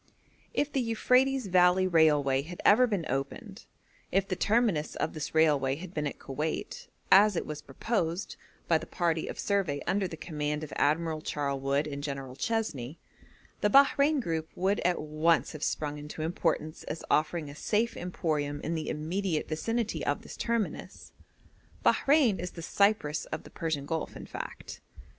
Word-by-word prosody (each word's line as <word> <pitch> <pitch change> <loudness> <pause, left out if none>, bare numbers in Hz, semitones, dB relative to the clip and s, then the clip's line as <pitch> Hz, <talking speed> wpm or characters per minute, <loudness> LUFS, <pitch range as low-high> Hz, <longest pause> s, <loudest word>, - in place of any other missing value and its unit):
If 290 - 0
the 270 - +2
Euphrates 250 +3 +2
Valley 180 0 +4
Railway 150 -6 +4
had 170 +5 -9
ever 250 +5 +6
been 200 -8 -1
opened, 165 - -4 0.4
if 195 0 +2
the 185 - -1
terminus 210 -8 +1
of - - -2
this 155 0 -5
railway 145 -4 +3
had 175 +4 -9
been 150 -1 -1
at - - -6
Koweit, 155 - -4 0.2
as 205 0 +7
it - - -1
was 150 -1 -6
proposed 185 -5 -2 0.3
by 165 -2 +4
the - - -9
party 165 -3 0
of - - -6
survey 190 -8 0
under 195 0 +1
the 165 - -8
command 150 -2 -3
of 150 - -7
Admiral 155 +1 +1
Charlewood 140 -1 -1
and 140 -2 -5
General 135 -3 -5
Chesney, 160 - -2 0.6
the 210 - +2
Bahrein 280 +4 +5
group 160 -8 -2
would 195 +3 +1
at 180 0 +1
once 155 +2 +1
have 155 -1 -7
sprung 150 -1 -2
into 150 +1 -6
importance 160 -1 -1
as 160 - -5
offering 155 +1 +1
a 145 - -8
safe 215 +9 0
emporium 150 -5 -2
in 165 - -2
the 160 -1 -3
immediate 160 +2 -2
vicinity 225 +8 -2
of - - -1
this - - -9
terminus. 230 -3 -3 0.7
Bahrein 275 - +4
is 180 +1 -3
the 165 - -8
Cyprus 170 -6 +1
of - - -5
the - - -14
Persian 160 -4 -2
Gulf, 160 +1 -3
in - - -8
fact. - - -8
165 Hz, 165 wpm, -29 LUFS, 150-200 Hz, 0.7 s, as